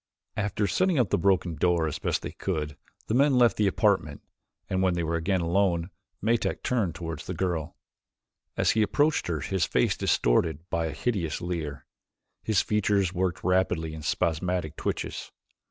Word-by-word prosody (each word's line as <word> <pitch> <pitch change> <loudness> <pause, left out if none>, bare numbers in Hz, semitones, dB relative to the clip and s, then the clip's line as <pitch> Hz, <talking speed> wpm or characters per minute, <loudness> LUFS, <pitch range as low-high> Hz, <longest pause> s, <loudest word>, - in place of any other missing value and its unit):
After 105 0 -1
setting 185 - +1
up 120 -7 +2
the - - +3
broken 90 -1 +2
door 85 +1 +2
as 75 - -3
best - - -1
they - - -4
could, 75 -6 -3 0.3
the - - -2
men 135 +2 +4
left 120 -2 +5
the 105 - +3
apartment 95 -8 +1 0.4
and 95 0 0
when 95 -2 +2
they 85 - -1
were 80 +1 -2
again 90 +3 0
alone 85 0 +1 0.3
Metak 115 +2 0
turned 110 - 0
toward 80 -3 -5
the - - -6
girl. 85 -5 -2 0.8
As - - +3
he 110 - +2
approached 145 +9 +2
her, 80 -4 -2
his 95 -1 0
face 60 - +1
distorted 80 +7 +1
by 85 -1 0
a - - -3
hideous 95 -11 -1
leer, 80 -5 -4 0.6
his 110 -4 +2
features 100 -3 +1
worked 90 0 -1
rapidly 90 -3 +1
in 80 - -7
spasmodic 85 +1 -1
twitches. - - -4
90 Hz, 170 wpm, -27 LUFS, 80-100 Hz, 0.8 s, left